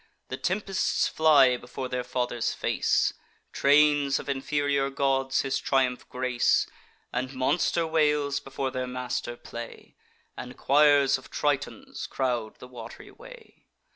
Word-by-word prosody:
The 130 - -4
tempests 195 +3 0
fly 140 -5 +5
before 125 +2 -7
their 125 0 -3
father's 125 -1 -2
face, - - +1 0.4
Trains 145 -1 +4
of - - -7
inferior 140 0 0
gods 135 -1 0
his 135 0 -1
triumph 130 -2 0
grace, 125 -1 +1 0.5
And 130 +2 -3
monster 165 +5 +1
whales 150 -3 +1
before 135 -1 -4
their 130 -1 -3
master 125 -1 -4
play, 120 -1 -10 0.4
And - - -9
choirs 145 -1 +4
of - - -16
Tritons 150 - -3
crowd 120 -5 -2
the 125 - -12
wat'ry 120 -3 -11
way. - - -15
135 Hz, 125 wpm, -27 LUFS, 125-145 Hz, 0.5 s, fly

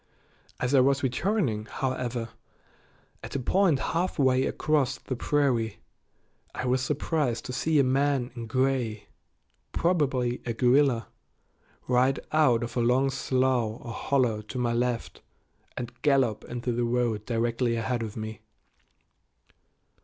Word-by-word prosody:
As 125 +2 -1
I 135 - +6
was 135 +2 +3
returning, 130 - 0
however, 125 -2 -3 0.9
at - - -8
a - - 0
point 175 +4 +3
halfway 135 -5 +1
across 140 -4 0
the 130 - -5
prairie 125 -4 0 0.8
I - - -3
was 125 +1 +1
surprised 145 -3 -1
to 125 - -5
see 155 +4 +1
a 140 - +5
man 135 -1 +1
in 115 -2 -6
gray, 125 -3 -1 0.6
probably 135 -8 +1
a 120 - -2
guerrilla, 125 0 +3 0.8
ride 130 +2 +3
out 130 -7 +3
of 120 - -6
a - - +1
long 130 +3 +3
slough 130 -3 0
or 115 - -8
hollow 125 -4 +1
to 110 +5 -8
my 120 -1 0
left 120 0 -2 0.6
and 120 -1 -5
gallop 135 -7 +2
into 120 0 -3
the 120 +1 0
road 120 -2 0
directly 115 +1 0
ahead 115 +1 -1
of 110 -1 -5
me. 110 -1 -6
125 Hz, 130 wpm, -27 LUFS, 120-135 Hz, 0.9 s, I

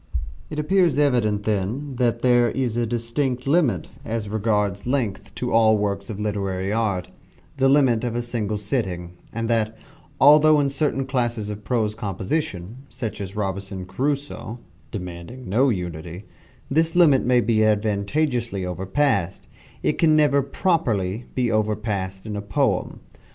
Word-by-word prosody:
It 150 - -6
appears 165 -1 +2
evident, 120 -8 +2
then, 110 +8 -2
that 120 -2 +1
there 120 -1 +4
is 125 -2 -1
a 120 -1 0
distinct 120 +3 -2
limit, 145 -3 +2 0.2
as 115 -4 -3
regards 105 -1 0
length, 100 -7 -2
to 125 - -3
all 110 -1 +5
works 100 -1 -2
of 105 -2 -5
literary 100 -2 -2
art 100 -5 -1 0.5
the 135 0 +4
limit 130 -5 +4
of 120 -1 -2
a 120 - -1
single 110 -3 -2
sitting 95 -5 -3 0.2
and 115 0 -3
that, 110 -1 0 0.4
although 150 +2 +7
in 140 -1 +2
certain 140 -1 -1
classes 120 -5 -1
of 105 0 -8
prose 110 -1 0
composition, 100 - -3
such 115 -3 -5
as 100 0 -6
"Robinson 95 -2 -3
Crusoe" 140 +1 -3 0.3
(demanding 90 +6 -7
no 125 +8 +3
unity), 90 -2 -4 0.4
this 160 +4 +1
limit 155 -7 +5
may 125 0 +4
be 115 -1 +2
advantageously 110 +1 0
overpassed, 95 - 0 0.4
it - - 0
can 155 -2 +5
never 145 -2 +4
properly 120 - 0
be 125 -2 +1
overpassed 105 -3 -1
in 105 -1 -4
a 100 - -3
poem. 100 -1 -1
115 Hz, 145 wpm, -23 LUFS, 100-130 Hz, 0.5 s, although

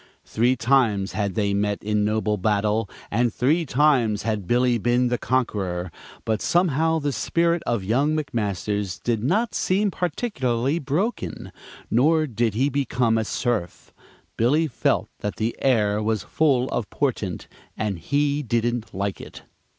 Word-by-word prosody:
Three 120 +3 +2
times 115 -6 +2
had 100 -3 -2
they 100 -2 +1
met 100 0 -1
in 105 0 +1
noble 105 0 0
battle, 105 +1 0 0.2
and 120 +2 +2
three 155 +9 +1
times 125 -7 +2
had 105 -5 -2
Billy 120 0 +2
been 120 +3 +2
the 120 - -1
conqueror, 95 -8 -1 0.3
but 110 -1 0
somehow 160 -2 +2
the 145 -2 -1
spirit 170 +8 +1
of 115 -5 0
young 140 +10 +1
McMasters 105 - -2
did 115 -3 0
not 215 - +1
seem 200 +2 +1
particularly 145 - -1
broken, 145 - -3 0.4
nor 155 +7 +3
did 115 -5 -1
he 130 +5 +2
become 125 -5 +1
a 110 - +1
serf. 110 -5 -3 0.4
Billy 145 +8 +3
felt 155 - 0
that 105 - -3
the 110 +2 -2
air 105 -5 +2
was 110 0 -1
full 135 -5 +1
of 115 -4 -3
portent, 110 -10 -2 0.3
and 100 -4 -2
he 145 - 0
didn't 120 -3 -1
like 100 0 -3
it. - - -11
120 Hz, 145 wpm, -23 LUFS, 105-140 Hz, 0.4 s, nor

